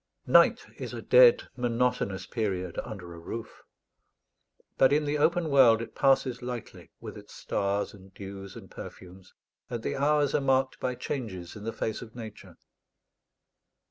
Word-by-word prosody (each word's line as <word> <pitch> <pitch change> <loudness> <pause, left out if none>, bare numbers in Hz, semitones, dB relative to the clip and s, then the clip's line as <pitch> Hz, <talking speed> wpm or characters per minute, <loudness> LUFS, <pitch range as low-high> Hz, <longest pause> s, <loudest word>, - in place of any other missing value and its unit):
Night - - +5
is - - -6
a - - -6
dead - - +7
monotonous 120 -6 -1
period 95 -7 -3
under 95 -7 -8
a 85 - -10
roof: 110 +7 -7 1.1
but 130 0 +5
in 150 +1 +2
the 145 0 -1
open 165 +2 +2
world 125 -5 +6
it 115 - -7
passes 130 -2 +2
lightly, 125 -2 -7
with - - -8
its - - -15
stars 100 0 -1
and 95 -1 -15
dews 100 -1 -9
and - - -12
perfumes, 95 +1 -11 0.3
and 120 -2 -4
the - - -2
hours 145 0 +2
are - - +2
marked 135 -1 +1
by 125 -1 -2
changes 110 -9 -5
in 105 0 -9
the 115 - -2
face 110 -1 -3
of 115 -1 -11
Nature. 110 -3 -10
115 Hz, 155 wpm, -28 LUFS, 100-135 Hz, 1.1 s, dead